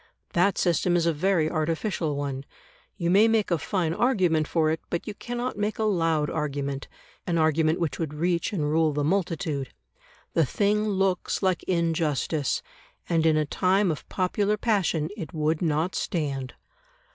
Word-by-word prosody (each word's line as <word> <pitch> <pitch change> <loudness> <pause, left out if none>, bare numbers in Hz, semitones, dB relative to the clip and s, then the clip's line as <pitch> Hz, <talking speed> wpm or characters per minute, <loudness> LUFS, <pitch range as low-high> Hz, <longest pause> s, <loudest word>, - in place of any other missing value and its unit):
That 185 +3 +3
system 175 0 +2
is 170 -1 +2
a 170 - +2
very 170 0 +2
artificial 160 0 -1
one; 140 -1 -3 0.5
you 170 -2 0
may 205 +4 +6
make 220 -4 +1
a 170 - +2
fine 170 -1 -1
argument 180 - +2
for 155 -2 +2
it, 160 - -2
but 170 - -2
you 210 - -5
cannot 245 +1 -4
make 210 +2 -1
a 220 - -1
loud 165 -7 +1
argument, 140 -2 -3 0.4
an 170 -2 +1
argument 160 0 +2
which 160 -6 -2
would 155 -3 -3
reach 170 +4 0
and 185 -8 -1
rule 155 0 +2
the 145 0 -1
multitude. 160 -5 -1 0.6
The 165 - +4
thing 210 - +1
looks 195 -1 0
like 185 -2 +2
injustice, 160 -4 0 0.4
and 165 -2 +2
in 155 -1 +4
a 155 - +2
time 185 +4 +2
of 155 - -7
popular 200 +3 0
passion 190 -9 +1
it 165 -7 -7
would 155 +1 0
not 160 +2 0
stand. 140 -6 -2
165 Hz, 165 wpm, -26 LUFS, 155-190 Hz, 0.6 s, may